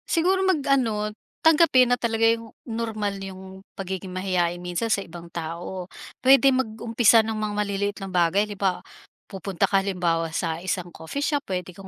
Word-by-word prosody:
Siguro 370 +3 +2
mag 375 -4 +2
ano, 220 -6 +1 0.3
tanggapin 295 -6 +5
na - - +2
talaga 225 -1 +1
yung 230 -1 +1
normal 220 -3 -3
yung 190 0 -9 0.2
pagiging 190 -1 -5
mahiyain 180 -2 -1
minsan 180 +6 -2
sa 205 - +2
ibang 170 0 -11
tao, 170 +2 -6 0.3
puwede 270 +1 +6
mag-umpisa 230 -2 +3
ng 220 0 -2
mga 215 -1 -2
maliliit 205 0 -1
na 195 - -5
bagay 180 +2 +2
di 205 - -7
ba? 190 -2 0 0.5
Pupunta 190 -2 -4
ka 195 - +4
halimbawa 175 -4 0
sa 165 -2 -1
isang 180 -1 -3
coffee 165 - -5
shop 290 -1 0
puwede 180 -1 -3
kang 195 +2 -12
200 Hz, 165 wpm, -24 LUFS, 180-230 Hz, 0.5 s, puwede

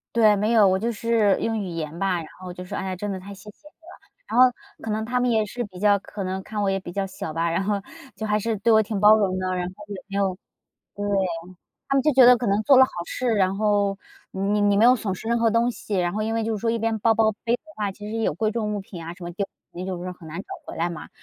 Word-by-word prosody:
对， 215 -2 +6
没 210 +3 +1
有， 215 -3 +6
我 190 0 +3
就 230 +4 -1
是 225 -3 +2
用 225 -1 -1
语 200 - -3
言 165 -1 -5
吧， 195 -2 +1
然 160 - -6
后 180 -1 -7
就 180 +1 -8
说： - - -5
“哎 190 - -4
呀， 185 -1 -3
真 205 +2 -4
的 190 - -5
太 200 +2 -9
谢 210 +2 -12
谢 300 +8 -18
你 - - -29
了”。 330 +2 -17 0.2
然 245 - -1
后 255 0 +8 0.3
可 225 - -4
能 220 +1 -1
他 250 +2 -1
们 245 -1 +2
也 220 -2 +2
是 240 +4 -5
比 185 -3 -11
较 205 0 +4
可 200 0 -7
能 190 +1 -3
看 210 0 -4
我 195 - +2
也 195 0 -1
比 175 - -8
较 195 0 -1
小 160 -4 -6
吧， 165 0 0
然 170 +3 0
后 205 +1 0 0.4
就 220 - -4
还 210 0 +2
是 225 +1 -1
对 225 +3 +3
我 220 0 +6
挺 210 -1 -3
包 210 +1 +8
容 190 -3 0
的， 185 0 -1
然 180 -1 -2
后 185 - -11
也 200 -2 -7
没 200 - -5
有 195 -2 +1 0.6
对。 205 - -4 0.8
他 275 - 0
们 270 - +3
就 305 - +3
觉 260 -1 +7
得 250 0 +8
可 240 - -3
能 200 +2 +2
做 270 +3 +6
了 260 - +9
好 - - -5
事， 255 - -4
然 195 -4 +2
后 205 -2 +1 0.3
你 200 +2 0
你 205 -1 +3
没 220 - +5
有 250 +1 +7
损 200 -4 -3
失 220 - -7
任 235 - +2
何 230 -1 +3
东 230 +2 +2
西。 210 0 -6
然 175 -1 +1
后 215 +1 -2
因 220 +1 -1
为 225 -1 0
就 225 -1 -1
是 - - -7
说 230 - +1
一 230 - 0
边 225 0 0
包 225 +1 +4
包 220 -1 +3
背 235 +1 +2
的 - - -51 0.2
话， 205 -2 -1
其 210 +2 -9
实 225 - -3
有 220 - +1
贵 215 +5 0
重 215 -2 -2
物 205 - -2
品 175 -3 -9
啊， 170 - -6
什 180 - -15
么 175 - -5
就 195 +2 -3 0.2
你 180 +1 -6
就 185 -2 -4
是 185 - -4
很 165 -3 -13
难 165 +4 -6
找 - - -11 0.2
回 - - -8
来 170 +1 0
嘛。 165 - -8
205 Hz, 330 characters per minute, -24 LUFS, 190-225 Hz, 0.8 s, 了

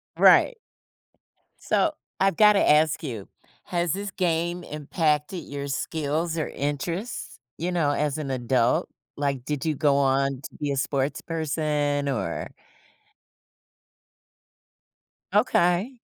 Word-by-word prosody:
Right. - - +6 1.0
So, 320 - +1 0.3
I've 195 -2 +3
gotta 210 -1 +6
ask 155 +1 +4
you. 115 -9 -5 0.4
Has 175 -2 -1
this 200 +3 -3
game 175 -1 -1
impacted 150 +2 -1
your 140 0 -6
skills 160 +3 -2
or 155 - -1
interests, 165 - -4 0.2
you 175 +4 -2
know, 165 -5 +1
as 145 0 0
an 140 -3 -4
adult? 125 -1 +1 0.3
Like, 140 -3 -1
did 145 +1 -3
you 155 -1 0
go 140 -1 +3
on 135 0 +2
to - - -10
be 145 -1 -2
a - - 0
sportsperson? 145 0 -1
Or 85 -9 -3 2.9
Okay. 180 +9 +2
150 Hz, 110 wpm, -25 LUFS, 140-170 Hz, 2.9 s, Right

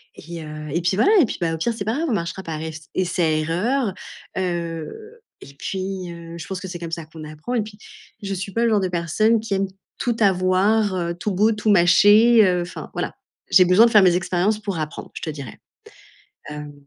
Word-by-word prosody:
Et 170 0 -8
heu, 150 0 -8
et 170 - 0
puis 175 +2 +1
voilà 390 - +4
et 315 - +6
puis, - - -5
bah, 165 -1 0
au - - -3
pire, 235 +9 -1
c'est 205 -3 -5
pas 220 +2 0
grave, 330 +2 -1
on - - +1
marchera 175 -1 -3
par 155 -3 -5
ess 160 -1 -7
essai 170 -4 +1
erreur, 205 - 0 0.4
heu, 180 - -4 0.2
et 140 - -12
puis, 185 +3 -4
heu, 170 0 -9
je 165 - -7
pense 190 -1 -4
que 190 - -6
c'est 180 -1 -6
comme 170 -1 -6
ça 165 -1 -4
qu'on 155 0 -11
apprend 155 +11 -5
et 225 - +1
puis 210 -1 -12 0.5
je 195 0 -3
suis 190 +1 -5
pas 230 +1 +1
le - - +3
genre 215 -2 +3
de 185 - -1
personne 180 +7 +1
qui 215 -2 -4
aime 195 0 0 0.3
tout 240 -2 -1
avoir, 195 +1 +2
heu, 170 -1 -2
tout 200 +4 -3
beau, 210 +4 +3
tout 215 0 -1
mâché, 205 +5 +6
heu, 180 -1 +2
enfin 175 0 -7
voilà». - - -3 0.4
J'ai 185 - +7
besoin 180 +6 +6
de 235 - +2
faire 210 -3 +7
mes 180 -2 +5
expériences 185 +3 0
pour 200 -4 -3
apprendre 155 +1 -5
je - - -7
te - - -4
dirais. 140 -6 -9 0.9
Hem, 150 0 -7
185 Hz, 230 wpm, -22 LUFS, 170-210 Hz, 0.9 s, J'ai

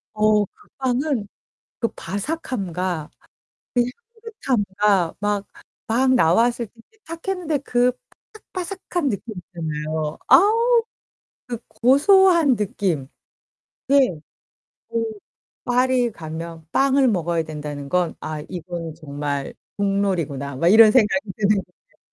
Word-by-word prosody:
어 210 -1 +3
그 - - -24
빵은 260 -3 0 0.5
그 230 - +1
바삭함과 185 - -3 1.0
그 460 0 -13 0.2
향긋함과 200 -6 +1
막, 205 0 -1 0.4
막 255 +3 +3
나왔을 235 +4 +3
때 - - -37 0.2
이제 440 - -29
탁했는데 330 -2 -3
그 250 -2 +2 0.6
바삭바삭한 360 -4 -3
느낌 215 +1 -5
있잖아요. 155 -3 -4
아우. 460 +5 +5 0.7
그 240 -1 -3
고소한 325 - +5
느낌. 190 - -1 0.8
네. 265 - +3 0.7
그 230 0 -1 0.6
'파리에 250 -1 +2
가면 160 -2 -7
빵을 275 -1 +3
먹어야 170 -4 0
된다는 150 -2 -6
건 180 -1 +1
아 155 -1 -4
이건 170 -2 -6
정말 145 -2 -4 0.2
국룰이구나.' 185 -9 -1
막 165 +6 +1
이런 220 +2 +8
생각이 220 -1 +2
드는 210 -1 +2
거죠. 190 - -10
210 Hz, 220 characters per minute, -22 LUFS, 170-265 Hz, 1.0 s, 이런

